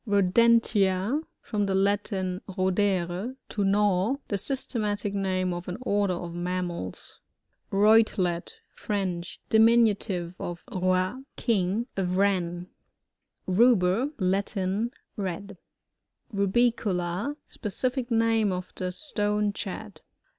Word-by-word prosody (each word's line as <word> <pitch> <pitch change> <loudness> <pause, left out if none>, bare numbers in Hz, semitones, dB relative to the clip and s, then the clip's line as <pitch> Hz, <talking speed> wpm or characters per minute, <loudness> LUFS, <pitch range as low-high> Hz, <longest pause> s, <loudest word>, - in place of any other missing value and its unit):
RoDENTiA 205 +2 +3
— - - -54
From 205 -2 +1
the 190 - +1
Latin, 195 -1 0
rodere, 190 +2 0
to 205 - -1
gnaw. 200 +3 +2
The 200 - 0
systematic 210 -4 -2
name 185 -2 0
of 175 0 -6
an 180 - -4
order 200 -5 +1
of 175 -1 -6
mammals. 175 - -4 0.5
RoiTELBT. 200 -4 +3
— - - -45
French. 185 -4 -3
Diminntive 220 -6 +3
of 175 0 -5
rot, 185 +3 +1
a 265 - -11 0.2
king. 210 0 +1
A 195 - 0
Wren. 180 -2 0 0.8
Ruber. 205 +2 +4
— - - -39
Latin. 195 +2 0 0.3
Red. 195 0 -4 0.7
RasiooLA, 200 +1 +1
— - - -54
Specific 250 +3 -3
name 225 -3 +2
of 180 0 -5
the 185 0 -3
Stonechat. 210 -3 -2
195 Hz, 110 wpm, -27 LUFS, 185-215 Hz, 0.8 s, Ruber